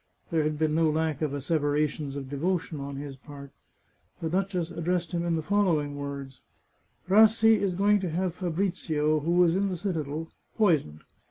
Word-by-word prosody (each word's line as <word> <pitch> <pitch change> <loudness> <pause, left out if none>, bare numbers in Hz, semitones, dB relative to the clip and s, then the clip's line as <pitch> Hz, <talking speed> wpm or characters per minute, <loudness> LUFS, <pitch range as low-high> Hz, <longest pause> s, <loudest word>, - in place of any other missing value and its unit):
There 165 -1 +2
had 150 0 -1
been 155 0 +1
no 160 0 +3
lack 155 -1 -1
of 155 -3 0
asseverations 145 0 -1
of 140 -2 -5
devotion 160 +2 -2
on 140 0 -6
his 140 0 -6
part. 140 0 -12 0.7
The 160 -1 -3
duchess 180 -2 -1
addressed 170 +1 -2
him 170 -1 -1
in 170 -1 0
the 160 - -2
following 165 -7 +1
words: 140 -2 -7 0.3
" - - -41
Rassi 220 +2 +5
is 190 -3 0
going 205 +2 +3
to 185 -2 -3
have 175 +2 -1
Fabrizio, 165 -4 0
who 170 +4 +3
is 170 0 +3
in 200 +1 +1
the 185 - -3
citadel, 160 -4 -3 0.3
poisoned. 155 - +2
160 Hz, 175 wpm, -27 LUFS, 145-180 Hz, 0.7 s, Rassi